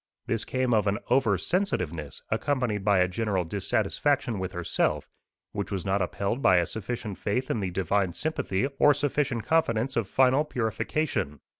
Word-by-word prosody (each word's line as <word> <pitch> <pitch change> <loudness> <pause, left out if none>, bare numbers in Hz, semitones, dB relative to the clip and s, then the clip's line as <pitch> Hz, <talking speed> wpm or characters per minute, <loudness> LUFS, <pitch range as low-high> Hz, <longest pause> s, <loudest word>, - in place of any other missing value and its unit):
This 115 -3 -1
came 130 -1 0
of 105 -2 +2
an 100 +1 +1
over 125 -6 +3
sensitiveness, 90 - -2
accompanied 125 -8 0
by 100 -1 +4
a 90 - +4
general 95 -1 -1
dissatisfaction 110 - 0
with 95 -1 -3
herself, 85 -2 -1 0.4
which 100 -1 -4
was 95 -3 -3
not 95 0 +1
upheld 100 +7 -2
by 95 -6 +5
a 85 - +3
sufficient 110 -1 -5
faith 125 +6 -1
in 115 - 0
the 95 -2 -2
divine 95 +1 0
sympathy, 125 - -1
or 145 -1 +6
sufficient 140 -5 -1
confidence 135 -6 +1
of 115 -4 0
final 130 +6 +4
purification. 120 - -2
105 Hz, 160 wpm, -27 LUFS, 95-130 Hz, 0.4 s, or